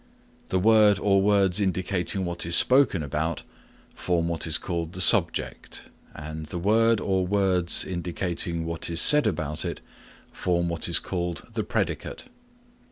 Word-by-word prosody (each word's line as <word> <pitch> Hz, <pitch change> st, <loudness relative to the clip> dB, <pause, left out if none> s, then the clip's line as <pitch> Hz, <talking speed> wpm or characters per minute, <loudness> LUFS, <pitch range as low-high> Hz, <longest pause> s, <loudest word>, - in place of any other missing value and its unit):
The 95 Hz, -, 0 dB
word 105 Hz, 0 st, +4 dB
or 100 Hz, -1 st, +2 dB
words 100 Hz, -1 st, +2 dB
indicating 95 Hz, 0 st, -2 dB
what 85 Hz, 0 st, -3 dB
is 85 Hz, 0 st, +2 dB
spoken 125 Hz, -, +3 dB
about 75 Hz, +2 st, -3 dB, 0.5 s
form 85 Hz, -2 st, -2 dB
what 85 Hz, -1 st, -3 dB
is 80 Hz, -, +1 dB
called 85 Hz, -2 st, -5 dB
the 90 Hz, -, -7 dB
subject 90 Hz, -, +1 dB, 0.2 s
and 80 Hz, +1 st, -8 dB
the 85 Hz, -, -6 dB
word 110 Hz, +4 st, +2 dB
or 95 Hz, -2 st, -1 dB
words 95 Hz, -3 st, +1 dB
indicating 85 Hz, -1 st, -3 dB
what 85 Hz, 0 st, -4 dB
is 85 Hz, 0 st, +1 dB
said 150 Hz, +8 st, +6 dB
about 75 Hz, -2 st, -3 dB
it -, -, -5 dB, 0.5 s
form 85 Hz, -1 st, -1 dB
what 85 Hz, 0 st, -3 dB
is 85 Hz, -, +3 dB
called 85 Hz, -2 st, -4 dB
the -, -, -2 dB
predicate. -, -, -4 dB
90 Hz, 150 wpm, -25 LUFS, 85-100 Hz, 0.5 s, said